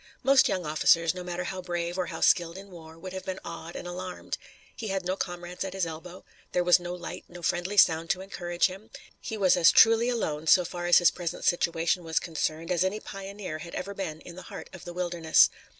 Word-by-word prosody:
Most 270 -1 +5
young 180 -2 -1
officers, 160 +2 +3
no 180 -1 -7
matter 180 0 -4
how 185 +1 -5
brave 175 -1 -3
or 185 -2 -1
how 165 -1 -6
skilled 170 0 +3
in 195 0 -11
war, 160 -2 -12
would 185 +2 -8
have 190 - -5
been 190 0 -5
awed 170 0 -8
and 175 - -6
alarmed. 180 +1 -5 0.4
He 220 - -6
had 195 -2 -2
no 185 +1 0
comrades 175 -1 -5
at 190 -1 -5
his 190 -2 0
elbow. 165 +3 -9 0.3
There 180 - +2
was 175 0 +6
no 175 0 -5
light, 175 -2 -8
no 175 0 -11
friendly 180 +4 -1
sound 165 -3 +5
to 185 - 0
encourage 175 -2 -1
him, 195 +3 -4 0.3
he 220 - -5
was 190 -3 +4
as 170 -2 +6
truly 225 +2 +6
alone, 160 -10 -2
so 180 +2 +6
far 175 0 -4
as 175 - +7
his 175 -1 +5
present 175 -2 -5
situation 175 +1 +1
was 160 -1 -3
concerned, 165 0 -3
as 175 0 +2
any 190 +3 -1
pioneer 195 -5 -7
had 170 - -8
ever 195 +2 -4
been 160 -6 -5
in 170 - -11
the 185 - -9
heart - - -9
of 185 - -11
the 175 - -7
wilderness. 175 -2 +3
175 Hz, 230 wpm, -28 LUFS, 170-190 Hz, 0.4 s, as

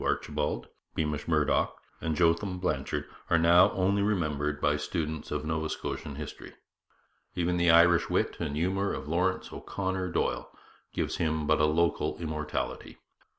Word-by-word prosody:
Archibald, 75 -1 -1 0.3
Beamish 75 -2 -2
Murdoch, 75 -3 +2 0.2
and 80 -1 -1
Jotham 90 +3 +2
Blanchard 80 -5 -2 0.2
are 85 - +5
now 85 +2 +6
only 95 +2 +2
remembered 75 -8 0
by 75 0 +2
students 80 +1 -3
of 75 0 -3
Nova 80 0 -1
Scotian 75 - -4
history. 75 0 -8 0.8
Even 90 0 +1
the 85 0 +3
Irish 85 +1 +6
wit - - 0
and 75 -3 -2
humour 95 +5 0
of 65 - -5
Laurence 90 +4 0
O'Connor 95 -1 -3
Doyle - - -1 0.4
gives - - -2
him 80 -2 0
but 75 0 +3
a - - +5
local 85 +2 +1
immortality. 75 -2 -4
80 Hz, 145 wpm, -29 LUFS, 75-90 Hz, 0.8 s, now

